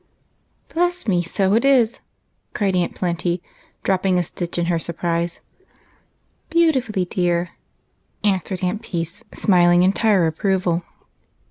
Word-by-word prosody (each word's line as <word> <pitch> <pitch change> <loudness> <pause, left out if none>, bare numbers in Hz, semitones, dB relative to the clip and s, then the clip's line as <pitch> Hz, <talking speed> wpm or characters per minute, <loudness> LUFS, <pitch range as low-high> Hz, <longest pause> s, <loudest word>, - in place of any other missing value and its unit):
" - - -31
Bless 350 -2 0
me, 180 -4 +2
so 190 +3 0
it 230 +3 +3
is! 255 -5 +3 0.3
" - - -47
cried 195 -3 +1
Aunt 180 -1 0
Plenty, 175 0 -1 0.4
dropping 190 -1 +1
a 180 - +2
stitch 175 +1 -5
in 175 - +1
her 170 -1 +1
surprise. 170 +1 -2 0.5
" - - -42
Beautifully, 260 - +2
deui 175 -1 0 0.4
," - - -44
answered 190 -2 0
Aunt 185 +4 -1
Peace, 170 +5 -5
smiling 175 -3 +4
entire 195 -1 +3
approval. 180 +1 0
185 Hz, 135 wpm, -21 LUFS, 175-210 Hz, 0.5 s, smiling